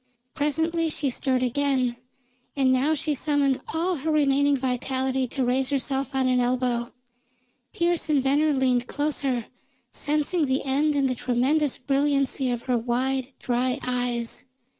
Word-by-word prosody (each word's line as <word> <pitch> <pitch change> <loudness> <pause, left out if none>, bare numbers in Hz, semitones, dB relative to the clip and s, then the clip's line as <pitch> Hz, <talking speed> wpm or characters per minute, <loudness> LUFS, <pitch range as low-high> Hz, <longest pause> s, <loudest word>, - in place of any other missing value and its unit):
Presently 320 +3 0
she 290 -3 -1
stirred 255 0 0
again, 255 -1 +1 0.6
and 265 -2 +3
now 280 +5 +2
she 300 +1 -1
summoned 285 -2 +1
all 340 +3 0
her 300 +4 -3
remaining 285 -2 +3
vitality 260 0 -1
to 260 +1 -2
raise 260 +2 +1
herself 275 0 -2
on 260 -1 +2
an 255 -1 +2
elbow. 245 -1 0 0.8
Pearse 340 -1 0
and 295 -2 +3
Venner 290 +3 +2
leaned 255 -3 +1
closer, 280 -5 -1 0.5
sensing 300 +2 0
the 260 +1 0
end 290 +3 +1
in 280 -1 +2
the 260 - +1
tremendous 260 +4 +1
brilliancy 275 -1 0
of 240 -1 -2
her 250 -2 0
wide, 255 +3 -1
dry 250 +1 0
eyes. 245 -1 -2
270 Hz, 140 wpm, -25 LUFS, 255-290 Hz, 0.8 s, and